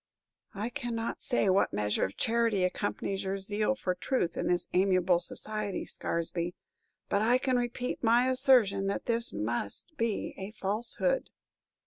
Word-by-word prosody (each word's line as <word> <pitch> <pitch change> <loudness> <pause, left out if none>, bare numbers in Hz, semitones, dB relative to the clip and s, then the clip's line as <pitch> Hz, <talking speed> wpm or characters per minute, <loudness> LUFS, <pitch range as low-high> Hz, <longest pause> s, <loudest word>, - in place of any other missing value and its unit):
"I 210 +4 -2
cannot 235 -4 -3
say 245 -5 +1
what 190 +1 +3
measure 105 0 0
of 95 - -3
charity 230 -4 +2
accompanies 195 +1 -2
your 195 0 -2
zeal 210 +5 0
for 185 -8 -1
truth 180 -1 -1
in - - -2
this 175 -1 +1
amiable 185 -1 +3
society, 210 +1 -2
Scaresby, 170 +1 -3 0.5
but 200 - +1
I 235 +3 +4
can 255 0 0
repeat 245 +1 -2
my 240 +2 +4
assertion 250 -7 +4
that 200 - -2
this 235 0 +1
must 110 - -3
be 230 -2 -1
a 195 +3 -6
falsehood." 235 - 0
205 Hz, 145 wpm, -30 LUFS, 185-240 Hz, 0.5 s, I